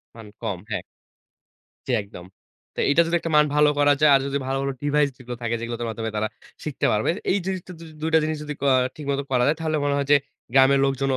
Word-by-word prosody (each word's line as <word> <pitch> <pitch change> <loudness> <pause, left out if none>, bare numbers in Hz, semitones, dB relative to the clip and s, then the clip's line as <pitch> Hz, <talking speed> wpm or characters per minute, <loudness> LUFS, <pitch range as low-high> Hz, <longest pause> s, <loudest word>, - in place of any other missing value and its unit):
মান 115 -2 -11
কম, 105 -6 -2
হ্যাঁ। 100 -3 -2 1.0
জ্বী, 130 - -1
একদম। 90 -3 -12 0.5
তো - - -18
এটা 160 +4 +5
যদি 170 - +1
একটা 165 - -4
মান 150 0 +6
ভালো 150 0 +5
করা 145 0 +5
যায়, 150 -1 +6
আর 135 - +5
যদি 140 0 -1
ভালো, 135 0 -1
ভালো 140 0 -1
ডিভাইস 145 0 +2
যেগুলো 125 -1 -8
থাকে, 115 0 -1
যেগুলো 115 0 -4
তার 120 - -2
মাধ্যমে 110 0 -4
তারা 110 +1 0 0.4
শিখতে 150 -3 -1
পারবে। 105 +7 +1 0.2
এই 200 - +3
জিনিসটা 185 -1 -4
দ - - -17 0.2
২ 160 +1 -1
টা - - +8
জিনিস 155 0 -1
যদি 150 0 -5
ক - - 0 0.3
ঠিক 150 - -8
মতো 140 0 0
করা 125 -2 +2
যায়, 150 +2 +2
তাহলে 155 -1 -1
মনে 145 0 +1
হয় 140 -1 -1
যে, - - +9 0.4
গ্রামের 135 +1 +5
লোকজনও 135 0 0
140 Hz, 235 wpm, -23 LUFS, 120-150 Hz, 1.0 s, যে